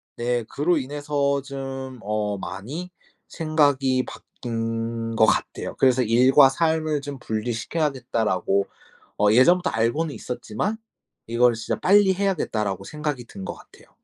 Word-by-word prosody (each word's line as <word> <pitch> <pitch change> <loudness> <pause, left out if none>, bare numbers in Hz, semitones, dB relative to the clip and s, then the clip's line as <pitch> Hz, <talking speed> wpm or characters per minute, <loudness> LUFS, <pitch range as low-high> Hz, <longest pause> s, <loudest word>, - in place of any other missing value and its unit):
네 120 0 -1
그로 150 +9 0
인해서 140 0 -1
좀 135 -1 -6
어 105 -1 -2
많이 120 - -6 0.4
생각이 145 -5 +1
바뀐 115 -1 -4
거 110 - +6
같아요. - - -1
그래서 130 -1 +4
'일과 130 +4 +6
삶을 155 0 0
좀 140 -1 -7
분리시켜야겠다.'라고 115 - -1 0.5
어 105 0 +4
예전부터 175 +11 +5
알고는 135 +8 0
있었지만 125 - -3 0.5
이거를 120 +1 +3
'진짜 110 - -3
빨리 195 0 +5
해야겠다.'라고 110 - -1
생각이 150 -2 -4
든 115 - -12
거 - - -4
같아요. - - -18
130 Hz, 295 characters per minute, -24 LUFS, 115-150 Hz, 0.5 s, 거